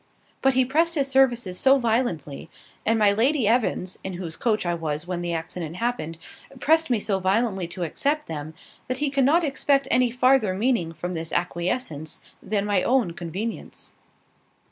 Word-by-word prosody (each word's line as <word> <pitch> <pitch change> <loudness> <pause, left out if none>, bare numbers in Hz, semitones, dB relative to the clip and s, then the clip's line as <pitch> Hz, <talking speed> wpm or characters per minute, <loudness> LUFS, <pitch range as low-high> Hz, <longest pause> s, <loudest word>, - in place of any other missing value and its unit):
But 270 -1 +3
he 260 0 +4
pressed 330 +6 +1
his 280 -3 +1
services 245 -8 +2
so 270 +1 +5
violently, 220 - -1 0.4
and 225 +1 +4
my 210 -2 +5
Lady 240 +3 +2
Evans 220 -5 0
(in 190 - -4
whose 175 -2 -6
coach 220 -5 0
I 175 - +1
was 160 -1 -3
when 180 -1 -3
the 175 0 -2
accident 165 0 -5
happened) 230 -7 -2 0.4
pressed 320 +3 +3
me 240 -3 +2
so 200 -2 -1
violently 190 -1 0
to 175 +1 -5
accept 285 - -1
them, 155 0 -6 0.3
that 255 - -2
he 290 0 -1
cannot 280 +5 +3
expect 275 -1 +1
any 250 -1 +4
farther 250 -5 +3
meaning 220 -6 +1
from 175 +3 -5
this 165 -1 -4
acquiescence 170 - -2 0.2
than 205 -1 -1
my 205 -3 +2
own 245 -8 +2
convenience." 185 +7 -6
215 Hz, 165 wpm, -24 LUFS, 175-260 Hz, 0.4 s, so